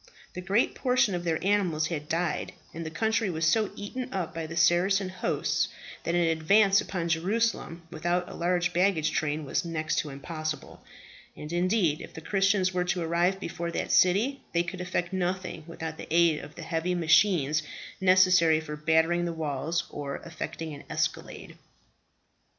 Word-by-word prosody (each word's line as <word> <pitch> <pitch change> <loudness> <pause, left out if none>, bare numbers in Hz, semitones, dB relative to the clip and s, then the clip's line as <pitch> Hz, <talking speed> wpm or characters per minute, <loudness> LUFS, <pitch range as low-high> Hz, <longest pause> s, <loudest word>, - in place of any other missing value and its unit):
The 180 - -5
great 195 +6 +1
portion 250 -5 +2
of 175 -1 -2
their 165 -2 +1
animals 185 -6 +2
had 150 -3 -4
died, 170 +1 -1 0.2
and 165 - -5
the 160 - -4
country 220 +5 0
was 165 -2 -1
so 210 +6 +3
eaten 250 +5 -6
up 175 -4 -3
by 165 -1 -4
the 160 - -7
Saracen 180 +4 +3
hosts, 185 - 0 0.4
that 170 - -1
an 175 - +3
advance 195 +5 +4
upon 175 -3 -3
Jerusalem 175 0 -1
without 175 +2 -1
a - - -9
large 175 0 0
baggage 175 -4 +2
train 155 0 -1
was 135 - -1
next 160 -2 -1
to 150 - -3
impossible; 155 +2 -6 0.5
and 150 +2 -7
indeed 175 -3 +1
if - - -11
the - - -6
Christians 195 +1 +2
were 180 0 +1
to 180 -1 -1
arrive 175 +3 +1
before 170 -2 -4
that - - -2
city, 220 +10 +3
they 170 0 +2
could 180 +1 -6
effect 180 0 -2
nothing 180 -3 -2
without 160 -1 -6
the - - -7
aid 165 -2 +4
of 145 - -11
the 170 - -8
heavy 165 +2 -1
machines 160 -3 +3 0.4
necessary 185 -4 +5
for 150 -1 -6
battering 160 +3 +2
the 170 - -2
walls 160 +2 -2
or 140 -1 -4
effecting 165 -1 -6
an 140 - -10
escalade. - - -3
170 Hz, 170 wpm, -28 LUFS, 160-185 Hz, 0.5 s, necessary